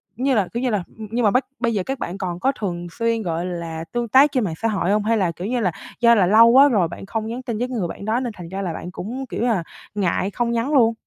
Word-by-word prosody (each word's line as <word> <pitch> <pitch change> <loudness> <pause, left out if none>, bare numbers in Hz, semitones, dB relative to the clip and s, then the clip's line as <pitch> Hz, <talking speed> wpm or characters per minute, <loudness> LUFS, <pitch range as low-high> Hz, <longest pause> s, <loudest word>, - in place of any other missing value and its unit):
như 265 +3 +1
là, 200 -4 +2
kiểu, 235 - -2
như 255 - +1
là 205 -6 0
ừm, 220 -1 -7
nhưng 240 0 0
mà 205 - +5
bắc 255 +1 +2
bây 235 -2 0
giờ 195 -3 0
các 270 -1 -3
bạn 180 +3 -4
còn 180 -3 -4
có 265 - +2
thường 175 -4 -3
xuyên, 230 +3 0
gọi 170 0 -2
là, 165 -2 -5
tương 240 0 -1
tác 275 +5 +6
trên 255 -5 +1
mạng 170 -5 -2
xã 225 - +2
hội 200 -3 0
hông? 210 0 +2
Hay 225 +1 +2
là, 180 -4 +1
kiểu 175 +4 -6
như 245 +1 0
là, 185 -6 +1 0.3
do 235 -1 +6
là 195 - +4
lâu 220 +5 +7
quá 265 +4 +7
rồi 195 -9 +2
bạn - - -9
không 220 +2 -3
nhắn 240 +3 -4
tin 235 -3 -3
với 245 +3 -1
người 220 -9 -2
bạn 200 - -8
đó 225 +3 +1
nên 245 -4 -3
thành 170 -2 -8
ra 195 +1 -4
là 175 -4 -3
bạn 175 - -7
cũng, 245 +9 -5
kiểu - - -4
như 240 - +2
là, 210 -8 +1 0.3
ngại 195 0 0
không 235 +2 -1
nhắn 235 +6 -1
luôn? 230 -4 +5
220 Hz, 310 wpm, -22 LUFS, 185-240 Hz, 0.3 s, lâu